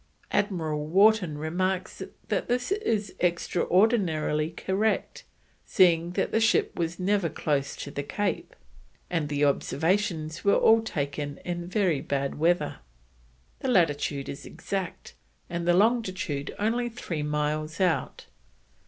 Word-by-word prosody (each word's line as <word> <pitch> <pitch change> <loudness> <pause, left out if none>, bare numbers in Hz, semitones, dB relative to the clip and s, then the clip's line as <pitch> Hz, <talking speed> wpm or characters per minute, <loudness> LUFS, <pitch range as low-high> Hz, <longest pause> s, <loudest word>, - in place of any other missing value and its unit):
Admiral 160 -7 -1
Wharton 190 -2 +4
remarks 185 +4 -2 0.3
that - - 0
this 245 +6 -1
is 225 - -1
extraordinarily 175 -3 +1
correct, 190 +6 -1 0.4
seeing 175 -3 +3
that - - -1
the 225 - +2
ship 225 - +2
was 170 +1 -2
never 195 -2 +1
close 140 -3 -1
to 140 - -7
the 140 - -3
Cape, 205 +8 -3 0.6
and 160 -4 -1
the 145 0 +1
observations 160 +2 0
were 200 - +4
all 225 0 +5
taken 145 -7 -3
in 175 -1 -3
very 180 -6 +1
bad 140 0 -2
weather. 165 -2 +1 0.8
The - - -3
latitude 145 - +1
is 140 - -7
exact, 190 -3 -5 0.4
and 170 0 -3
the 175 - +5
longitude 185 - 0
only 235 +3 0
three 185 -9 -5
miles 150 +1 -2
out. 180 -3 0
175 Hz, 125 wpm, -27 LUFS, 150-200 Hz, 0.8 s, all